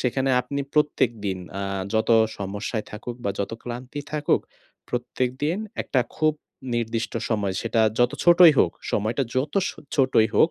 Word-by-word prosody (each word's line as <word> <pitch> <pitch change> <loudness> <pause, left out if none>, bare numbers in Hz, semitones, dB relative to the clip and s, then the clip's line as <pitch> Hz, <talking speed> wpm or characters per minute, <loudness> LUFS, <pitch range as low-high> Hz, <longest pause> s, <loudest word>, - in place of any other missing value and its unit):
সেখানে 130 +1 0
আপনি 140 +3 -4
প্রত্যেকদিন 115 -10 +1 0.2
আ - - -2 0.3
যত 110 - +1 0.3
সমস্যায় 105 +3 -3
থাকুক 115 +3 -6
বা 100 - +1
যত 100 - -2
ক্লান্তি 125 +4 -6
থাকুক, 150 -1 +2 0.5
প্রত্যেকদিন 130 +7 -1 0.2
একটা 130 - +1 0.2
খুব 155 0 +3 0.4
নির্দিষ্ট 115 0 -2 0.2
সময়, 105 -4 0 0.5
যত 120 +2 +3
ছোটই 175 -1 +8
হোক, 85 - +4 0.2
সময়টা 115 +6 0
যত 135 +3 -1
সো - - -8 0.2
ছোটই 130 -5 +4
হোক, 160 - +5
125 Hz, 135 wpm, -24 LUFS, 110-140 Hz, 0.5 s, ছোটই